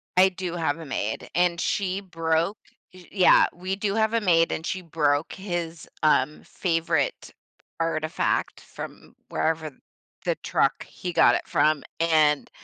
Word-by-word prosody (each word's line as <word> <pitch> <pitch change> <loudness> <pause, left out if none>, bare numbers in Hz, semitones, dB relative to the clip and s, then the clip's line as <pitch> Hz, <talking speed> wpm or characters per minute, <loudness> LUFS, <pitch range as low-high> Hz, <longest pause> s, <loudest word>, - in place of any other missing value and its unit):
I 185 +1 +6
do 180 -2 -5
have 160 -2 -1
a 165 - -8
maid, 110 -5 -3
and 175 -1 +2
she 190 +2 -1
broke 165 +1 -1 0.4
eh 185 -1 -14
Yeah, 190 -3 +6
we 185 +2 -3
do 200 0 -2
have 220 0 +2
a 230 - +2
maid, 165 -4 +3
and 160 - -3
she 185 +2 -3
broke 150 -3 0
his, 175 -4 -5 0.2
um, 150 -1 +2
favorite 165 -5 -1 0.5
artifact 155 -1 -1
from - - -10
wherever 160 -1 -1 0.5
the - - +1
truck - - +1
he 180 - -6
got - - +5
it - - -3
from, 155 -2 +2 0.2
and 155 -3 +3
165 Hz, 145 wpm, -25 LUFS, 160-185 Hz, 0.5 s, I